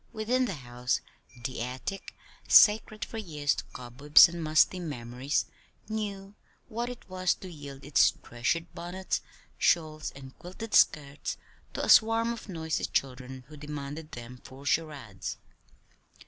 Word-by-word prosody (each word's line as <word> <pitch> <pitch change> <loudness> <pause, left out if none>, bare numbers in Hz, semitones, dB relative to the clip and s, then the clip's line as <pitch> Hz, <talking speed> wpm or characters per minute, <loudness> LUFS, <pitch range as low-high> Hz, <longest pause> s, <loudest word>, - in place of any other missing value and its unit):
Within 240 +4 +1
the 195 - -3
house, 125 -2 -2 0.5
the 130 -3 -3
attic, 130 +10 -5 0.3
sacred 215 0 +6
for 225 - -6
years 150 -8 0
to - - -5
cobwebs 125 +4 +5
and 170 -1 -6
musty 155 +4 +4
memories, 130 -3 -2 0.4
knew 205 -2 -4 0.4
what 235 +2 -3
it 245 - -9
was 185 -1 0
to 190 - -10
yield 145 -5 -10
its 145 - +5
treasured 165 +8 -2
bonnets, 180 +2 -3 0.4
shawls, 155 -2 +1
and 135 -1 -11
quilted 200 +5 -8
skirts 140 -1 +3 0.4
to - - -1
a - - -4
swarm 225 +1 +6
of 230 - -10
noisy 160 -3 -2
children 130 -1 -3
who 155 - -12
demanded 150 +1 -7
them 125 +1 -9
for 135 +2 -12
charades. 145 - -2
155 Hz, 135 wpm, -29 LUFS, 135-195 Hz, 0.5 s, sacred